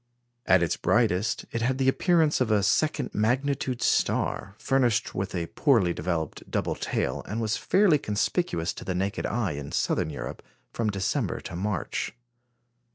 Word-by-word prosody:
At 95 -2 +5
its 85 - 0
brightest, 110 -3 +1
it 115 - -2
had 130 +3 +1
the 135 -1 +1
appearance 160 +1 +3
of 125 - +2
a 105 -2 +3
second 150 +9 +1
magnitude 130 +3 0
star, 95 0 0
furnished 125 -4 +1
with 95 0 -3
a 85 -2 -1
poorly 105 - +2
developed 80 -1 -3
double - - -1
tail, 65 - -2
and 110 +3 -3
was 110 -1 0
fairly 190 -7 +3
conspicuous 105 - -1
to - - -9
the 95 - -3
naked 95 +2 -1
eye 110 -4 -1
in 70 -1 -6
Southern - - 0
Europe, 75 - -6 0.3
from 115 -2 0
December 100 -2 -1
to - - -7
March. 100 -1 -2
105 Hz, 160 wpm, -27 LUFS, 90-130 Hz, 0.3 s, At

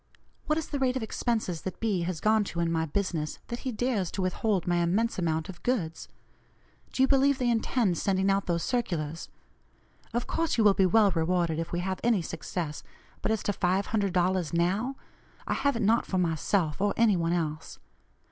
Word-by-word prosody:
What 305 - +2
is 320 - -3
the 285 - -2
rate 260 -1 +1
of 250 - -3
expenses 220 -6 -2
that 190 - -6
B. 210 -6 0
has 170 -1 -2
gone 215 0 +3
to 170 - -5
in 170 -1 +1
my 160 -1 0
business, 160 -3 -2
that 235 - -4
he 260 - -3
dares 220 -6 -1
to 195 - -4
withhold 185 +1 0
my 175 0 +1
immense 190 +7 +1
amount 160 -2 -1
of 175 -2 -10
goods? 185 -11 -2 0.8
Do 260 - +2
you - - +5
believe 275 0 +4
they 250 -2 +1
intend 225 -5 +1
sending 190 -1 +1
out 195 0 0
those 170 -1 0
circulars? 170 - -2 0.8
Of 240 +1 -1
course 330 -4 -1
you 225 - +4
will 205 -1 +6
be 190 -1 +3
well 210 +1 +4
rewarded 165 -1 0
if 165 - -4
we 175 - -1
have 190 +1 -3
any 225 -6 +2
success, 160 -2 -4 0.4
but - - 0
as 220 - -1
to 205 - 0
$500 185 -3 0
'now,' 195 +10 +1 0.5
I - - -1
have 280 -2 +1
it 230 - -1
not 225 +3 +3
for 190 - -1
myself, 165 -1 0
or 205 0 +1
any 225 -3 +4
one 170 -1 0
else. 155 -2 -3
190 Hz, 195 wpm, -28 LUFS, 170-230 Hz, 0.8 s, will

